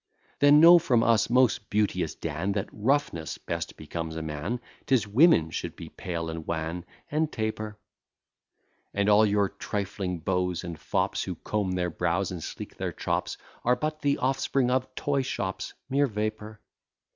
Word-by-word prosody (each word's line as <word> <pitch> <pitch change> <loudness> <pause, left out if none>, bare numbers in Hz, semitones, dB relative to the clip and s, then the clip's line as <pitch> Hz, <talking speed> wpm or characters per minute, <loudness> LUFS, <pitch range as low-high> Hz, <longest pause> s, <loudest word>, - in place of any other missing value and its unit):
Then 145 +1 +7
know 170 +2 +9
from 120 -7 +2
us, 115 -3 +3
most 125 -3 +3
beauteous 105 0 0
Dan, 80 +5 -2
That 100 0 -2
roughness 105 - 0
best - - -5
becomes 80 +1 -5
a 80 - -4
man; 80 +10 -3 0.3
'Tis 120 -6 +3
women 100 - +5
should - - -4
be - - -9
pale, 85 -2 -4
and 80 -1 -6
wan, 85 +1 -3 0.3
and 155 +1 +1
taper; 110 -1 -3 1.2
And 100 0 +1
all 105 +1 +6
your 100 -1 +2
trifling 100 -2 -3
beaux 90 +1 0
and 85 -2 -6
fops, - - -1
Who - - -4
comb 105 -3 -2
their 90 -1 -1
brows, 90 +4 0
and 90 -3 -5
sleek - - -7
their - - -2
chops, - - -2 0.3
Are 125 +1 +4
but 155 +2 -3
the 140 -1 +2
offspring 130 -1 +1
of 130 0 +1
toy 140 -1 0
shops, 95 -7 -4
mere 140 +1 +2
vapour. 105 -1 -4
105 Hz, 160 wpm, -27 LUFS, 90-130 Hz, 1.2 s, know